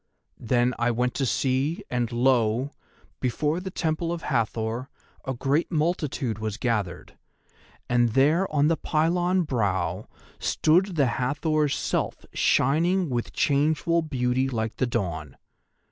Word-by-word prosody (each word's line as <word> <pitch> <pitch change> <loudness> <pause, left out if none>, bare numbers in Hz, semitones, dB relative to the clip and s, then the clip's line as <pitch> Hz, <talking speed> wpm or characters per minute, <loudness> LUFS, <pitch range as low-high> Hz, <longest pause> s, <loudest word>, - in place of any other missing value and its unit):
Then 120 +2 +1
I 120 +1 +2
went 125 +1 0
to 135 - -1
see, 135 - 0
and 120 -2 -1
lo! 120 +1 +2 0.5
before 150 +6 0
the 190 +1 -5
Temple 165 -1 -1
of 170 -1 -4
Hathor 115 0 -1 0.4
a 130 -1 -2
great 140 +8 0
multitude 150 - -1
was 110 -1 -3
gathered, 105 -8 -3 0.7
and 120 -2 +2
there 155 +9 +3
on 150 -1 +3
the 165 0 +2
pylon 175 +4 +1
brow 100 - -1 0.3
stood 180 +4 +2
the 145 -4 +3 0.2
Hathor's 150 +2 +1
self - - -2
shining 170 +5 +2
with 120 -1 -2
changeful 155 +4 +2
beauty 130 -3 0
like 110 -3 -3
the 130 - +1
Dawn. 85 - -3
130 Hz, 130 wpm, -26 LUFS, 120-155 Hz, 0.7 s, there